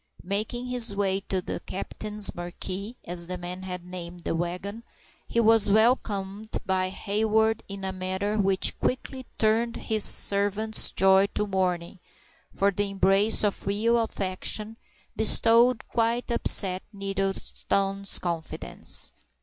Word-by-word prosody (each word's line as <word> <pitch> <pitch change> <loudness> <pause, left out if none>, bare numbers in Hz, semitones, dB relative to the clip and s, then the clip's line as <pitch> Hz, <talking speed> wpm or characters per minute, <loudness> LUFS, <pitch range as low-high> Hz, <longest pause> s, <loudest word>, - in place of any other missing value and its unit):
Making 215 +6 -3
his 245 -4 +2
way 195 -1 0
to 185 -2 -1
the - - -4
captain's 210 +2 -2
"marquee"—as 180 0 -5
the 180 0 -4
men 180 +1 -7
had 180 -2 -7
named 175 -1 -8
the - - -2
wagon—he 180 +7 -5
was 225 -2 +5
welcomed 215 -2 +1
by 185 -1 0
Hayward 220 +3 0
in 200 -1 -7
a 190 - -2
manner 190 +3 -2
which 195 -1 +2
quickly 260 0 -3
turned 230 +2 +1
his 215 -2 -1
servant's 205 +2 +3
joy 195 +1 +4
to 210 - 0
mourning, 185 -3 -2 0.5
for 200 +1 +1
the 205 +1 -1
embrace 195 +3 +2
of 205 -2 -1
real 225 +4 +2
affection 210 0 -3 0.4
bestowed 230 +2 +4
quite 235 +1 -1
upset 190 -5 +3
Nettleton's 195 0 0
confidence. 170 -3 -3
200 Hz, 120 wpm, -26 LUFS, 185-220 Hz, 0.5 s, was